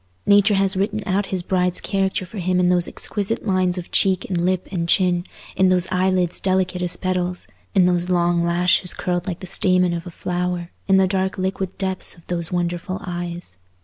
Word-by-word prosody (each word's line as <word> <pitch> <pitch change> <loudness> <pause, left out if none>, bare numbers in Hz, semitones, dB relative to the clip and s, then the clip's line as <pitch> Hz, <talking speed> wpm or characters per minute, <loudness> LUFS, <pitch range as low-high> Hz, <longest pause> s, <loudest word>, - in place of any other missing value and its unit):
Nature 205 +1 +5
has 195 0 +2
written 205 +3 -1
out 195 +1 0
his 185 -2 -2
bride's 180 -1 0
character 190 -1 -1
for 195 +3 -8
him 180 0 +1
in 180 0 +3
those 175 -1 +2
exquisite 210 +2 -2
lines 185 -2 +2
of 175 - -7
cheek 190 -2 +2
and 175 -2 -1
lip 185 0 0
and 170 -3 -2
chin, 180 -2 +2 0.3
in 190 -1 +4
those 185 -1 +4
eyelids 185 -1 +1
delicate 185 -1 0
as 180 -1 0
petals, 180 -1 -2 0.3
in 185 -2 +5
those 180 0 +2
long 175 -1 +2
lashes 175 +1 +2
curled 180 0 -2
like 180 -3 -4
the - - -6
stamen 180 -1 +2
of 170 +1 -5
a - - -5
flower, 180 0 -3 0.2
in 195 -1 +5
the 190 - +5
dark 190 0 -1
liquid 190 0 -3
depths 190 -1 -4
of 170 - -20
those 170 -2 -1
wonderful 175 +1 -2
eyes. 175 - -5
180 Hz, 195 wpm, -21 LUFS, 175-190 Hz, 0.3 s, Nature